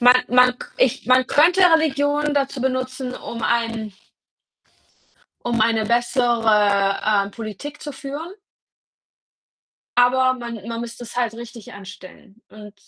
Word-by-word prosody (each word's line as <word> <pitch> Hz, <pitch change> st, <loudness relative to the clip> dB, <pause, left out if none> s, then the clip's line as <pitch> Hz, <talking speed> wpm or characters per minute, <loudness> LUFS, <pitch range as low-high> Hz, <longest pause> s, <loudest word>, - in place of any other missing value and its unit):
Man 250 Hz, +1 st, +7 dB
man 250 Hz, 0 st, +4 dB
k -, -, -9 dB
ich 250 Hz, -, +1 dB
man 255 Hz, 0 st, +4 dB
könnte 350 Hz, +6 st, +4 dB
Religion 295 Hz, -3 st, +2 dB
dazu 275 Hz, -2 st, -1 dB
benutzen, 255 Hz, 0 st, -3 dB
um 230 Hz, -1 st, -8 dB
ein 230 Hz, -3 st, -1 dB, 1.5 s
um 235 Hz, -2 st, 0 dB
eine 220 Hz, -1 st, +2 dB
bessere, 225 Hz, -4 st, +2 dB
ähm, 205 Hz, -2 st, +1 dB
Politik 230 Hz, +7 st, -8 dB
zu 295 Hz, -, -6 dB
führen. 290 Hz, +7 st, -7 dB, 1.6 s
Aber 255 Hz, +1 st, +4 dB
man 235 Hz, -2 st, -7 dB
man 230 Hz, 0 st, -4 dB
müsste 235 Hz, +1 st, -8 dB
es 235 Hz, -, -12 dB
halt 235 Hz, -3 st, -1 dB
richtig 235 Hz, -1 st, -11 dB
anstellen 200 Hz, +2 st, -13 dB
und 210 Hz, -1 st, -13 dB
240 Hz, 125 wpm, -21 LUFS, 225-265 Hz, 1.6 s, Man